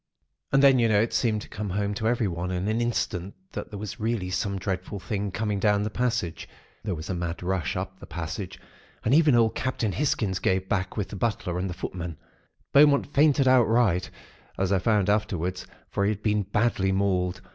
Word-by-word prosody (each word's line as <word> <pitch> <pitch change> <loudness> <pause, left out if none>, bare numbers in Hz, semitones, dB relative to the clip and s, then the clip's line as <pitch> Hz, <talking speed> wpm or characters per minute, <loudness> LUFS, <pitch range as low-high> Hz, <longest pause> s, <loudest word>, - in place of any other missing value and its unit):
"And 135 +1 +4
then, 135 -2 +7
you 115 -1 +3
know, 105 -2 +4
it 115 +2 0
seemed 110 -3 +1
to - - -12
come 105 -1 -5
home 100 +2 -1
to 110 +2 -2
everyone 95 -7 0
in 90 +1 -2
an 110 +2 0
instant 100 -5 -2 0.2
that - - -6
there 105 - -7
was 105 +3 -6
really 110 -4 -1
some 100 +1 -1
dreadful 95 +1 -3
thing 100 +3 -3
coming 105 +1 -2
down 105 0 +2
the 105 - -3
passage. 115 -9 -2 0.3
There 100 -4 -2
was 80 +2 -7
a - - -1
mad 85 0 -4
rush 90 -4 -1
up - - -5
the - - -11
passage, 85 +3 -5 0.5
and 115 - +3
even 150 -3 +5
old 115 -1 +4
Captain 120 -4 -1
Hisgins 105 -8 0
gave 95 0 +1
back 95 +1 -2
with 105 - -2
the - - -7
butler 95 -5 -1
and 95 +1 -2
the 90 - -5
footmen. 85 -3 -5 0.6
Beaumont 145 0 +5
fainted 145 -2 +4
outright, 115 -7 +3 0.5
as 95 0 0
I 95 - +3
found 105 0 +2
afterwards; 95 -4 -1 0.2
for 100 - 0
he 100 - +3
had 105 -1 -3
been 105 -1 +2
badly 100 -1 +1
mauled. 95 -2 0
100 Hz, 200 wpm, -26 LUFS, 90-115 Hz, 0.6 s, then